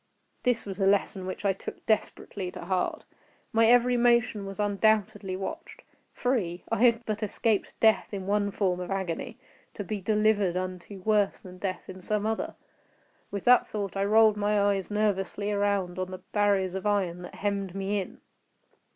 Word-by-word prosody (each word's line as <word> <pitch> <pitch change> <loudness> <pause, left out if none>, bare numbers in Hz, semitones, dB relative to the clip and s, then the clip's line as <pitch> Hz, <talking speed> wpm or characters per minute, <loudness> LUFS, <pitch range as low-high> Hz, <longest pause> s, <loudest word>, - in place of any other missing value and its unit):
This 245 -2 +1
was 195 0 -6
a 195 - +3
lesson 195 -1 +1
which 190 - -5
I 195 - +3
took 190 - -9
desperately 200 -3 -1
to - - -8
heart. 185 0 -1 0.5
My 225 0 +5
every 245 +1 +5
motion 235 -4 +2
was 195 +1 -8
undoubtedly 205 -1 +1
watched. 320 - -7 0.3
Free!—I 200 -6 -1
had 235 -1 +4
but 215 0 -3
escaped 215 0 -1
death 220 -1 +3
in 195 -2 -5
one 205 +1 +1
form 190 -3 0
of 180 - -5
agony, 190 -4 -3 0.4
to 205 - -4
be 205 +1 -4
delivered 210 -3 +2
unto 185 +1 -5
worse 210 -1 +2
than 185 -1 -12
death 185 -2 -4
in 185 0 -9
some 210 +2 -1
other. 220 0 -2 0.7
With 200 -2 -4
that 250 0 +5
thought 200 -2 -4
I 195 0 +1
rolled 215 0 +5
my 205 -1 +2
eves 195 -1 -4
nervously 205 -1 0
around 200 -3 0
on 185 0 -2
the 185 -1 -8
barriers 200 -3 +2
of 190 +2 -3
iron 185 -4 0
that 180 - -9
hemmed 200 -2 -2
me 195 +1 -1
in. 185 - -10
200 Hz, 170 wpm, -28 LUFS, 190-215 Hz, 0.7 s, My